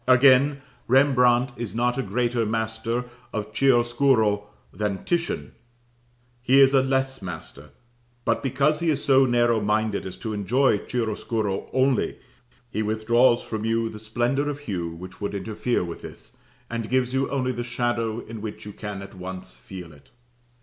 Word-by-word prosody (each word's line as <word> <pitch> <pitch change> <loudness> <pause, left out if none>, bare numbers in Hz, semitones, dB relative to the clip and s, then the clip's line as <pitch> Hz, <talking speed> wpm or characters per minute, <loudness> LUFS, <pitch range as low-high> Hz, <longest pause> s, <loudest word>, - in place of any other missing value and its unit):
Again, 135 +2 +5 0.2
Rembrandt 125 -1 +4
is 115 -2 -5
not 120 +1 +1
a - - +2
greater 120 -2 0
master 110 +2 -2 0.3
of 110 -1 -4
chiaroscuro 120 -4 +3 0.3
than 105 -2 -3
Titian; 175 -1 -1 0.9
he 130 +2 +4
is 135 0 +6
a 135 - +6
less 135 -1 0
master, 80 -5 -8 0.6
but - - +1
because 140 +3 +1
he 170 - 0
is 145 -2 0
so 135 -1 +5
narrow 120 -2 +3
minded 105 -1 0
as 90 - -8
to 110 -2 -4
enjoy 105 +3 +2
chiaroscuro 110 -3 -2
only, 130 0 +1 0.5
he 110 - -1
withdraws 120 +3 +3
from 110 -1 -4
you 115 0 0
the 110 - -9
splendour 120 +6 0
of 145 0 -5
hue 90 -11 -3
which 90 +4 -10
would 100 0 -3
interfere 110 +3 -1
with 85 -1 -7
this, - - -12 0.3
and 115 -1 -4
gives 130 0 +1
you 135 +1 +1
only 130 -2 0
the 120 -1 -4
shadow 120 -2 -1
in 115 -1 -9
which 105 -1 -7
you 105 - -8
can 105 -2 -6
at 100 - -11
once 90 -7 -8
feel 85 +7 -10
it. 70 -1 -20
120 Hz, 160 wpm, -25 LUFS, 105-130 Hz, 0.9 s, is